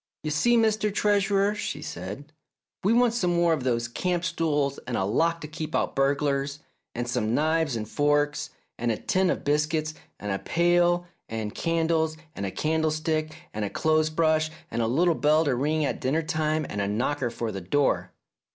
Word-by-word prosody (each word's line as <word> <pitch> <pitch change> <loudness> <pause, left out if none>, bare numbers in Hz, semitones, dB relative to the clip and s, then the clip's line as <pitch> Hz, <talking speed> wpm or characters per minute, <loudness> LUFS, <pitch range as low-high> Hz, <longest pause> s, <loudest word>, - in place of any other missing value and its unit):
"You 155 - -2
see, 240 +10 +3
Mr. 215 -2 +2
Treasurer," 200 0 +2
she 210 - -4
said, 100 - -7 0.5
"we 200 - +3
want 240 0 +4
some 180 -7 +1
more 170 -1 +3
of 150 -5 -2
those 120 -2 0
camp 175 +8 -1
stools 150 -5 0
and 125 - -1
a 95 - +1
lock 165 +11 +1
to 150 - -6
keep 155 0 -5
out - - 0
burglars, 140 0 +1 0.4
and 120 +1 -2
some 115 -1 0
knives 155 -2 +1
and 110 -2 -4
forks, 145 +1 +1 0.3
and 120 0 +1
a 110 - -1
tin 190 -1 +1
of - - -1
biscuits 155 +2 0 0.3
and 105 -1 -4
a 95 - -1
pail 175 +1 +2 0.2
and 110 -2 -4
candles 165 -1 0 0.2
and 100 - -3
a - - -4
candlestick 155 - 0 0.2
and 105 - -3
a 100 - -1
clothes 155 +4 +2
brush 155 0 +2 0.2
and 115 - -1
a 115 - +1
little 165 +9 +3
bell 155 +1 +3
to 140 - +2
ring 150 +4 +1
at - - -3
dinner 155 +6 +1
time 155 0 0
and 100 - -3
a 100 - 0
knocker 125 +5 0
for 115 -1 -4
the 95 - -5
door." 140 +11 +1
155 Hz, 190 wpm, -26 LUFS, 130-165 Hz, 0.5 s, want